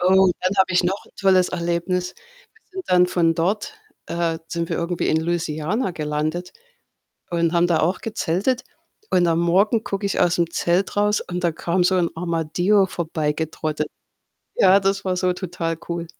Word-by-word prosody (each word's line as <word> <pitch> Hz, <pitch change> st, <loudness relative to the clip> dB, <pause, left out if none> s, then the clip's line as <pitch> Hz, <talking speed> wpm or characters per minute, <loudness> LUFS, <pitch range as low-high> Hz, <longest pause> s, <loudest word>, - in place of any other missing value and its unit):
Oh, 190 Hz, +1 st, +5 dB
dann 185 Hz, +1 st, +1 dB
habe 190 Hz, -1 st, +3 dB
ich 180 Hz, 0 st, +3 dB
noch 190 Hz, +3 st, -1 dB
'n -, -, -20 dB
tolles 185 Hz, -2 st, +3 dB
Erlebnis. 180 Hz, +1 st, -2 dB, 0.4 s
Wir -, -, -28 dB
sind 375 Hz, 0 st, -6 dB
dann 180 Hz, 0 st, +5 dB
von 170 Hz, -2 st, +2 dB
dort, 195 Hz, -, -1 dB, 0.3 s
äh, 170 Hz, -1 st, -1 dB
sind 170 Hz, 0 st, -3 dB
wir -, -, -2 dB
irgendwie 170 Hz, +1 st, -1 dB
in 160 Hz, -, +2 dB
Louisiana 170 Hz, +5 st, -1 dB
gelandet 155 Hz, +2 st, -3 dB, 0.8 s
und 170 Hz, -1 st, +1 dB
haben 170 Hz, 0 st, +3 dB
da 170 Hz, -2 st, +2 dB
auch 180 Hz, +4 st, 0 dB
gezeltet. 220 Hz, +4 st, -1 dB, 0.5 s
Und 180 Hz, -1 st, +3 dB
am 165 Hz, -, +2 dB
Morgen 195 Hz, +7 st, +2 dB
gucke 200 Hz, +1 st, -2 dB
ich 200 Hz, -, -1 dB
aus'm 170 Hz, -1 st, +3 dB
Zelt 175 Hz, +4 st, 0 dB
raus 210 Hz, 0 st, +2 dB
und 180 Hz, 0 st, -5 dB
da 170 Hz, -, +2 dB
kam 175 Hz, +3 st, 0 dB
so 185 Hz, +1 st, +3 dB
'n 175 Hz, -2 st, +1 dB
Armadillo 175 Hz, +4 st, +1 dB
vorbeigetrottet. 155 Hz, -2 st, -2 dB, 0.7 s
Ja, 195 Hz, +1 st, +6 dB
das 195 Hz, 0 st, 0 dB
war 185 Hz, -1 st, 0 dB
so 180 Hz, 0 st, +1 dB
total 175 Hz, -3 st, -3 dB
cool. 170 Hz, 0 st, -3 dB
175 Hz, 170 wpm, -22 LUFS, 165-190 Hz, 0.8 s, Ja